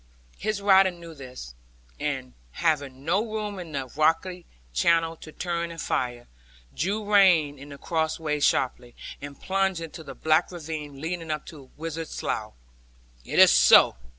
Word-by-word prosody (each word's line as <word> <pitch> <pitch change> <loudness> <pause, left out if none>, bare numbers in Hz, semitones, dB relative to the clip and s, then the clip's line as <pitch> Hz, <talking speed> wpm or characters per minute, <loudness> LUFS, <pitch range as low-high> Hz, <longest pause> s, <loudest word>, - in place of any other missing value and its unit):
His 215 -2 -2
rider 195 -1 +6
knew 170 -2 -11
this; 125 - -10 0.5
and, 65 - -3 0.2
having 140 - -1
no 195 +6 +2
room 215 -3 -4
in 170 -3 -8
the 135 -2 -2
rocky 165 +4 +1 0.3
channel 165 - +2
to 155 - -11
turn 170 0 -3
and 165 0 -9
fire, 120 -4 -2 0.5
drew 205 +6 -2
rein 165 -8 +5
at 140 +1 -11
the 140 - -9
crossways 160 -2 -1
sharply, 125 -3 0 0.3
and 140 -1 -9
plunged 190 -2 0
into 165 0 -8
the - - -9
black 155 +2 +2
ravine 155 -4 -7
leading 165 +1 -4
to 150 -1 -2
the 145 - -12 0.2
Wizard's 165 0 -5
Slough. 110 0 -3 0.7
'Is - - -1
it - - +9
so?' 65 0 +7
160 Hz, 150 wpm, -26 LUFS, 140-180 Hz, 0.7 s, it